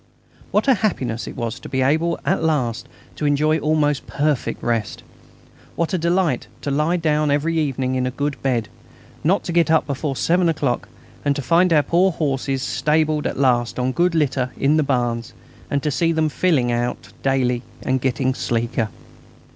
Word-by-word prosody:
What - - +1
a 270 - +7
happiness 125 - -1
it - - -7
was 115 -2 -3
to - - -10
be 130 -1 0
able 160 +5 +1
at 190 - +1
last 130 -8 0 0.3
to 150 - 0
enjoy 155 +2 +2
almost 150 -2 +1
perfect 145 -2 -1
rest! 115 -4 -2 0.7
What 170 +2 -1
a 185 - +1
delight 170 -5 +1
to 140 - -3
lie 150 +5 +1
down 155 -2 +1
every 155 +3 +1
evening 135 -3 -1
in 130 0 0
a - - 0
good 145 +2 -3
bed; 120 -5 0 0.6
not 185 +6 +2
to - - -4
get 170 -1 +3
up 160 -1 +3
before 140 0 -3
seven 175 +5 +2
o'clock; 145 -6 -1 0.4
to 140 0 -1
find 170 +7 +3
our 150 -3 +5
poor 180 +5 +3
horses 135 -4 -1
stabled 150 +5 +1
at - - -4
last 125 -3 +2
on 125 +1 0
good 175 +4 +1
litter 130 -4 +1
in 140 +3 +3
the - - +4
barns, 120 -5 -1 0.4
and 140 -1 -1
to 150 - 0
see 165 +4 +1
them 160 -1 +1
filling 145 -7 +1
out 120 +1 -3
daily 125 -3 +1 0.2
and 130 0 0
getting 130 0 0
sleeker! 115 -2 -1
145 Hz, 180 wpm, -21 LUFS, 130-160 Hz, 0.7 s, a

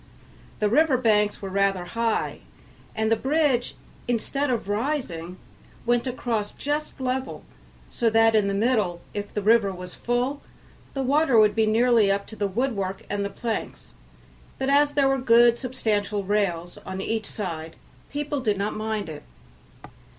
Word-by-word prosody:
The 210 - +1
river 285 +4 +4
banks 210 -4 +2
were 195 - -3
rather 195 -2 +1
high, 230 +4 -1 0.6
and 220 0 0
the - - +6
bridge, 270 0 +1 0.3
instead 260 +4 -1
of 235 -5 -1
rising, 205 - -2 0.5
went 240 +1 +1
across 230 -4 -2
just 295 +1 -3
level, 260 +1 -3 0.4
so 235 - 0
that 225 0 +4
in 210 -2 +3
the 200 - -1
middle, 205 -6 +1
if 205 0 -5
the 210 - -3
river 215 -1 +4
was 180 -1 -8
full, 250 +4 -1 0.5
the 270 - -1
water 275 -1 +3
would 210 -1 +5
be 220 -1 +2
nearly 225 -2 +4
up 200 0 -1
to - - -7
the 205 -1 -1
woodwork 200 -3 -2
and 205 0 -1
planks; 230 -2 -4 0.6
but 265 +1 0
as 290 +1 +4
there 280 -2 +3
were 270 0 +2
good 235 -1 +5
substantial 210 -5 -1
rails 185 -4 -1
on 190 0 -7
each 220 +3 -2
side, 165 -6 -5 0.3
people 290 0 -3
did 215 -6 0
not 200 +2 -1
mind 215 -2 -3
it. 150 -2 -7
220 Hz, 155 wpm, -25 LUFS, 200-255 Hz, 0.6 s, the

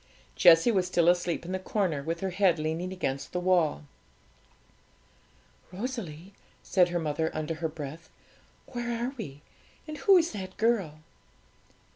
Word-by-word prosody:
Jessie 165 +6 +6
was 190 -4 +1
still 170 -2 +2
asleep 175 -1 0
in 180 - -5
the 190 - -1
corner, 185 -6 -1
with 165 +3 -4
her 190 -1 -2
head 185 -2 +3
leaning 160 +4 -2
against 140 -8 -3
the 180 - 0
wall. 175 -5 +2 1.9
'Rosalie,' 195 - -6 0.3
said 180 -3 +3
her 175 - -1
mother, 160 0 -1
under 155 +1 -2
her 160 0 -3
breath, 155 +1 -8 0.6
'where 240 -2 -4
are 260 - -4
we, 145 - -8 0.4
and 305 0 -6
who 385 +7 +6
is 335 -1 +2
that 185 -2 -7
girl?' 200 -9 0
175 Hz, 145 wpm, -28 LUFS, 160-200 Hz, 1.9 s, Jessie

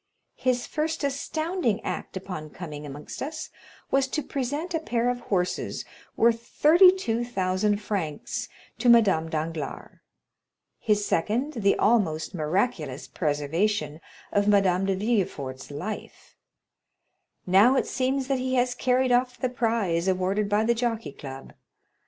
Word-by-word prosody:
His 250 -1 0
first 310 0 -2
astounding 280 - -1
act - - -4
upon 180 -5 -6
coming 150 -3 -8
amongst 145 +1 -8
us 315 +3 -5 0.4
was 270 0 +3
to 300 +2 -2
present 285 +7 -3
a 325 - +1
pair 245 -5 0
of 245 - -4
horses, 180 -6 -2 0.3
worth 230 0 +3
32,000 235 - +3
francs, 190 -8 -3 0.3
to 245 - +3
Madame 195 -9 +5
Danglars; 160 -2 -4 0.8
his 210 -2 +1
second, 235 - 0
the 200 -5 +2
almost 190 -9 +2
miraculous 160 - -1
preservation 155 +2 -1 0.3
of 205 0 +2
Madame 195 -2 +3
de 195 - +1
Villefort's 185 - -2
life; 150 +10 -7 1.1
now 200 +8 +5
it - - +2
seems 265 +1 0
that 270 -2 0
he 260 0 -1
has 245 0 +2
carried 255 +1 +1
off 250 0 +2
the 255 - 0
prize 225 -8 0
awarded 190 +2 +1
by 205 +1 +2
the 235 +2 +3
Jockey 230 - -2
Club. 135 -1 -9
215 Hz, 130 wpm, -26 LUFS, 180-250 Hz, 1.1 s, Madame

